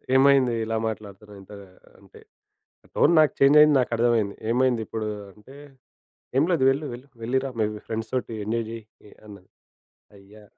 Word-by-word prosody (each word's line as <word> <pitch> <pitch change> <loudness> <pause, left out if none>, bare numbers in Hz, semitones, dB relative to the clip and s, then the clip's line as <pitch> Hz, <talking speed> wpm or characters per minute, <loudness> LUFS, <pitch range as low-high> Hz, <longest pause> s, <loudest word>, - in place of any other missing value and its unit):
ఏమైంది 135 -2 +4
ఇలా 110 0 -2
మాట్లాడుతున్నావు 105 -1 -9
ఇంత 95 - -17 0.5
అంటే, - - -18 0.8
టోన్ 170 - +3
నాకు 155 -3 +4
చేంజ్ 140 +2 +5
అయింది 150 -1 +6
నాకర్థమయింది. 115 -4 0
ఏమైందిప్పుడు 115 -3 -1 0.3
అంటే, 110 +7 -17 0.8
"ఏమి 140 +5 +3
లేదు 165 -6 +1
వెళ్ళు, 140 +3 -1
వెళ్ళు 125 +3 -11
వెళ్లి 120 +4 -1
రా - - -3
మీ 110 - +2 0.2
ఫ్రెండ్స్ 110 0 -5
తోటి 125 -2 -3
ఎంజాయ్ 115 +2 -2
చెయ్" 115 -1 -8 0.4
ఆన్నది 100 -3 -14 0.7
అయ్యా! 100 +2 -17
115 Hz, 140 wpm, -24 LUFS, 110-135 Hz, 0.8 s, అయింది